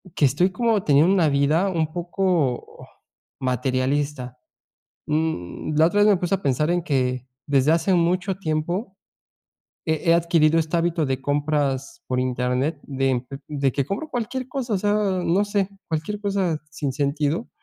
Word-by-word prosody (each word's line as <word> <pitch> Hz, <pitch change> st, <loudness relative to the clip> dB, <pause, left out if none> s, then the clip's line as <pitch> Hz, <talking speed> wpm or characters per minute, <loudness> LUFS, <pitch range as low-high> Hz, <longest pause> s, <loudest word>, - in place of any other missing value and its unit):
que 145 Hz, -, +3 dB
estoy 155 Hz, +8 st, +3 dB
como 225 Hz, -1 st, +1 dB
teniendo 150 Hz, +6 st, +4 dB
una 165 Hz, -6 st, +3 dB
vida 150 Hz, +7 st, +2 dB
un 165 Hz, -4 st, 0 dB
poco 175 Hz, -7 st, -1 dB, 0.5 s
materialista. 130 Hz, +1 st, -1 dB, 0.7 s
Mm, 150 Hz, -, -2 dB
la 160 Hz, -, +6 dB
otra 205 Hz, +3 st, +2 dB
vez 210 Hz, -, +6 dB
me 200 Hz, -, +5 dB
puse 180 Hz, +2 st, 0 dB
a 195 Hz, -, -7 dB
pensar 145 Hz, +1 st, +1 dB
en 175 Hz, 0 st, +1 dB
que 130 Hz, -4 st, -1 dB, 0.2 s
desde 145 Hz, +1 st, +3 dB
hace 170 Hz, +3 st, +2 dB
mucho 175 Hz, +2 st, +1 dB
tiempo, 175 Hz, +7 st, -2 dB, 0.9 s
he 160 Hz, -, +2 dB, 0.2 s
he -, -, +7 dB
adquirido 165 Hz, -2 st, +3 dB
este 160 Hz, +1 st, 0 dB
hábito 165 Hz, -1 st, 0 dB
de 130 Hz, 0 st, -1 dB
compras 145 Hz, -2 st, -1 dB
por 125 Hz, 0 st, 0 dB
internet 130 Hz, +4 st, -1 dB
de 135 Hz, -1 st, -1 dB, 0.5 s
de 135 Hz, -, +3 dB
que 140 Hz, 0 st, 0 dB
compro 205 Hz, -, -4 dB
cualquier 245 Hz, +2 st, -3 dB
cosa, 250 Hz, -5 st, -2 dB
o -, -, +1 dB
sea, 205 Hz, +2 st, +1 dB, 0.4 s
no 200 Hz, -, +3 dB
sé, 205 Hz, -2 st, 0 dB, 0.2 s
cualquier 165 Hz, +6 st, -2 dB
cosa 195 Hz, -6 st, 0 dB
sin 145 Hz, -3 st, -3 dB
sentido 145 Hz, -, -1 dB
155 Hz, 155 wpm, -23 LUFS, 140-185 Hz, 0.9 s, he